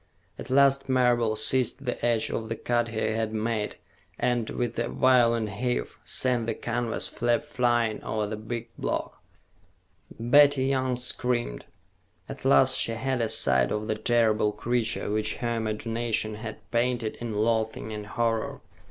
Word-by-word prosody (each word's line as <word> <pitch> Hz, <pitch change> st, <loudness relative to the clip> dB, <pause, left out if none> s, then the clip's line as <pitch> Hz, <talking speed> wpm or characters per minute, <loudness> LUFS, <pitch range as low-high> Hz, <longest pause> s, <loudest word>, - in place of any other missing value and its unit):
At -, -, -8 dB
last 135 Hz, 0 st, +3 dB
Marable 120 Hz, -4 st, +2 dB
seized 130 Hz, +5 st, +1 dB
the 125 Hz, -, -3 dB
edge 115 Hz, -2 st, +1 dB
of 110 Hz, -1 st, -3 dB
the 115 Hz, -, -2 dB
cut 120 Hz, +1 st, 0 dB
he 110 Hz, -1 st, -7 dB
had 110 Hz, 0 st, -1 dB
made 110 Hz, -1 st, -2 dB, 0.4 s
and, 120 Hz, -2 st, 0 dB
with 120 Hz, -2 st, -3 dB
a 120 Hz, -, 0 dB
violent 115 Hz, -4 st, +3 dB
heave, 120 Hz, +4 st, -2 dB
sent 125 Hz, -3 st, +1 dB
the -, -, -1 dB
canvas 120 Hz, -1 st, -2 dB
flap 120 Hz, +2 st, 0 dB
flying 120 Hz, -6 st, 0 dB
over 110 Hz, -1 st, -2 dB
the 105 Hz, +1 st, -4 dB
big 115 Hz, +2 st, -6 dB
block. -, -, -3 dB, 1.0 s
Betty 140 Hz, +3 st, +5 dB
Young 130 Hz, -2 st, 0 dB
screamed. 125 Hz, -, -2 dB, 0.6 s
At -, -, -9 dB
last 70 Hz, -, +5 dB
she 115 Hz, -, +1 dB
had 130 Hz, +2 st, -1 dB
a 115 Hz, -, 0 dB
sight 65 Hz, -9 st, +2 dB
of 105 Hz, 0 st, -2 dB
the 110 Hz, -, 0 dB
terrible 110 Hz, -1 st, +2 dB
creature 120 Hz, -3 st, -1 dB
which 110 Hz, 0 st, 0 dB
her 120 Hz, -1 st, -2 dB
imagination 110 Hz, 0 st, -1 dB
had 110 Hz, +1 st, -8 dB
painted 120 Hz, -2 st, 0 dB
in 115 Hz, -3 st, -5 dB
loathing 110 Hz, 0 st, 0 dB
and 105 Hz, -1 st, -6 dB
horror. 115 Hz, 0 st, -1 dB
115 Hz, 150 wpm, -27 LUFS, 110-125 Hz, 1.0 s, Betty